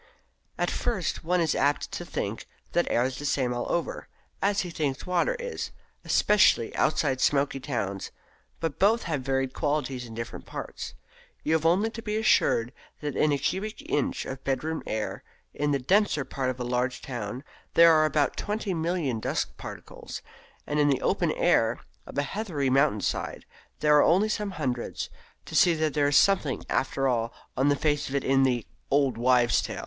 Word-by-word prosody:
At - - 0
first 220 -8 -2
one 180 +2 +1
is 160 -2 +2
apt 145 +1 +1
to - - -4
think - - -4 0.2
that 175 - +1
air 120 - +2
is 130 0 -2
the - - -7
same 130 -3 +1
all 120 - -3
over, 170 - -2 0.3
as 200 0 +2
he 180 - -5
thinks 145 -4 -2
water 180 - +1
is 485 0 -4 0.3
especially 205 - +3
outside 130 -4 +1
smoky 140 -1 +2
towns; 105 -8 -3 0.5
but 165 -4 -3
both 220 +4 +4
have 150 -5 -2
varied 135 0 -1
qualities 145 -5 -1
in 115 - -10
different 115 +1 -6
parts. - - -6 0.5
You 155 - +1
have 160 0 +3
only 200 +7 +3
to 230 - -7
be 215 -1 -2
assured 125 - +3 0.3
that 145 -2 -3
in 155 - +3
a 145 - +2
cubic 210 +9 -3
inch 145 - -1
of 130 0 -6
bedroom 155 +4 -1
air 110 -1 -3 0.3
in 145 0 -1
the 140 - +2
denser 155 +1 +2
parts 130 0 -2
of 130 0 -4
a 125 - -3
large 125 0 -1
town 120 0 -5 0.3
there 170 0 +8
are 155 0 +5
about 150 -1 +1
20,000,000 175 - -1
of - - -7
dust - - -2
particles, - - -8 0.4
and 150 0 -1
in 145 - +4
the 135 - +1
open - - +1
air - - +2 0.3
of - - -9
a 140 - +2
heathery 145 -5 -2
mountain 135 -6 +3
side - - -3 0.4
there 150 -1 +5
are - - +7
only 195 +6 +4
some 210 -1 -1
hundreds, 125 -6 -3 0.3
to - - -10
see 175 -2 +5
that 155 -2 0
there 145 -2 +2
is 145 0 +4
something 180 -9 +3
after 135 0 +1
all 115 -2 0 0.2
on 135 +2 +3
the 145 - +4
face 150 0 0
of 135 - -4
it 140 - 0
in 135 0 +3
the 125 -4 +2 0.2
"old 140 -3 +2
wives' 120 0 +3
saw." - - -2
145 Hz, 185 wpm, -27 LUFS, 130-170 Hz, 0.5 s, there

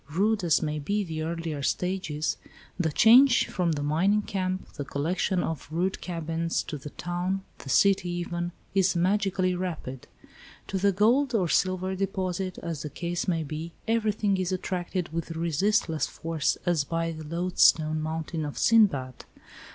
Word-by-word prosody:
Rude 200 +6 +1
as 165 -3 +3
may 150 -1 -2
be 205 +8 -1
the 160 -3 -4
earlier 165 -2 -3
stages, 160 -1 -1 0.4
the 160 -3 +1
change 235 - +6
from 175 -3 -1
the 145 -1 -3
mining 185 +8 +2
camp, 185 -3 -3
the 145 - -5
collection 175 +6 -1
of 160 -4 -4
rude 175 +4 -1
cabins, 165 -1 -2
to 150 - -6
the 150 - -8
town, 175 +4 -3 0.2
the 135 - -9
city 195 +5 +3
even, 175 0 -3 0.2
is 190 -1 +3
magically 185 0 +1
rapid. 165 -8 -5 0.6
To 190 - -1
the 200 +1 +3
gold 240 +7 +3
or 185 -5 +2
silver 185 +2 +1
deposit, 190 -1 -2
as 165 -4 -4
the 150 - -5
case 170 +4 -3
may 165 -3 +1
be, 155 +3 -6
everything 215 -3 +1
is 185 -1 -1
attracted 180 -2 -3
with 165 0 -4
resistless 165 0 +1
force 165 -3 -1
as 170 -4 +2
by 165 +2 -2
the 160 -1 -7
loadstone 160 -1 +3
mountain 160 +1 -3
of 145 -1 -5
Sindbad. 145 - +3
175 Hz, 155 wpm, -27 LUFS, 160-190 Hz, 0.6 s, change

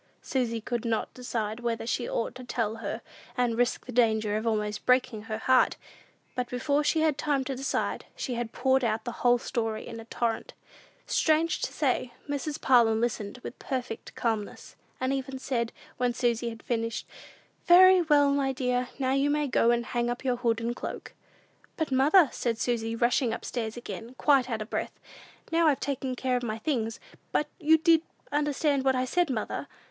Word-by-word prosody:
Susy 240 -4 -1
could 235 +1 -3
not 225 -2 -1
decide 230 -3 -3
whether 235 -1 -2
she 240 +1 -1
ought 230 - -2
to 255 - -9
tell 225 -3 -2
her, 225 +1 -4 0.4
and 245 -2 +1
risk 245 +1 0
the 250 - -7
danger 220 -3 +2
of 220 +2 -2
almost 210 -1 -1
breaking 250 -3 +2
her 215 0 -4
heart! 255 +3 +3 0.6
But 250 -1 -3
before 285 +4 +1
she 315 +2 +2
had 310 -3 +2
time 285 -3 +1
to 270 0 -4
decide, 270 +2 -2
she 255 - -3
had 235 -1 -3
poured 265 +1 +2
out 225 -1 0
the 240 - -2
whole 245 0 +5
story 225 -3 -3
in 230 - -7
a 225 - -9
torrent. 230 0 -2 0.5
Strange 320 +1 +2
to - - -2
say, 255 -4 0
Mrs. 290 +1 -3
Parlin 230 -4 +4
listened 230 -1 -2
with - - -8
perfect 250 -4 -5
calmness, 220 -4 -3 0.2
and 260 +1 0
even 270 0 -3
said, 240 -3 -2 0.3
when 245 -1 0
Susy 235 -1 0
had 225 -1 -10
finished, 230 -1 -2 0.6
"Very 370 +1 +8
well, 290 -3 +4
my 280 -1 +1
dear; 250 -1 -1
now 260 -1 +1
you 275 +1 +2
may 295 0 +1
go 235 -3 +3
and 235 0 +2
hang 240 0 -1
up 245 +2 -4
your 250 -2 +1
hood 235 -2 +1
and 235 +1 -2
cloak." - - -6 0.6
"But, 315 -4 -1
mother," 295 +6 +6
said 230 -2 -1
Susy, 230 -1 -1
rushing 240 0 +2
up - - -9
stairs 225 -2 -3
again, 240 0 -7
quite 270 -4 +3
out 220 -2 -2
of 215 - -16
breath, - - -3 0.5
"now 330 0 +4
I've 290 -3 +3
taken 265 -2 -2
care 255 0 0
of - - -3
my 220 -2 -3
things; 225 -3 -2 0.3
but 300 - 0
did 320 +1 +3
you 325 -1 +7 0.3
understand 290 -1 +1
what 265 -1 +3
I 255 0 +1
said, 350 +5 +1
mother? 225 -5 -3
245 Hz, 190 wpm, -28 LUFS, 230-275 Hz, 0.6 s, Very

